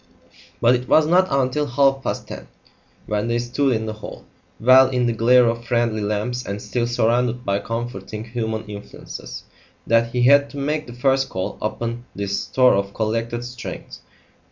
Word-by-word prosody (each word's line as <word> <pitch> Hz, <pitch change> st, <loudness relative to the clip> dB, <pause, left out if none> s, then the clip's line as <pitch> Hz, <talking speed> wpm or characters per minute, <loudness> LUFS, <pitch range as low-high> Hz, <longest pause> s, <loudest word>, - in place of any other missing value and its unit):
But 120 Hz, +1 st, +4 dB
it 125 Hz, 0 st, -1 dB
was 155 Hz, -, +5 dB
not 180 Hz, +4 st, +4 dB
until 135 Hz, +2 st, 0 dB
half 135 Hz, +1 st, +2 dB
past -, -, -4 dB
ten, -, -, -9 dB, 0.6 s
when 105 Hz, +1 st, -1 dB
they 120 Hz, 0 st, 0 dB
stood 125 Hz, +2 st, 0 dB
in 110 Hz, 0 st, -2 dB
the 110 Hz, -, -4 dB
hall, 110 Hz, -, -10 dB, 0.3 s
well 130 Hz, +2 st, +6 dB
in 125 Hz, -2 st, 0 dB
the 120 Hz, -, +1 dB
glare 120 Hz, +2 st, +5 dB
of 115 Hz, 0 st, -1 dB
friendly 120 Hz, -2 st, 0 dB
lamps 105 Hz, +4 st, -2 dB
and 100 Hz, -2 st, -5 dB
still 120 Hz, +3 st, -2 dB
surrounded 120 Hz, +1 st, 0 dB
by 100 Hz, 0 st, +1 dB
comforting 110 Hz, -2 st, -5 dB
human 110 Hz, -1 st, -4 dB
influences, 105 Hz, -1 st, -9 dB, 0.4 s
that 115 Hz, 0 st, +3 dB
he 125 Hz, 0 st, 0 dB
had 140 Hz, +2 st, +5 dB
to 145 Hz, -, -10 dB
make 150 Hz, +2 st, -2 dB
the 120 Hz, -, -9 dB
first 135 Hz, +2 st, +1 dB
call 95 Hz, 0 st, -4 dB
upon 115 Hz, +2 st, -3 dB
this 100 Hz, 0 st, -2 dB
store 130 Hz, -1 st, +3 dB
of 100 Hz, 0 st, -1 dB
collected 115 Hz, +2 st, -2 dB
strength. 125 Hz, -1 st, -8 dB
120 Hz, 175 wpm, -21 LUFS, 110-125 Hz, 0.6 s, well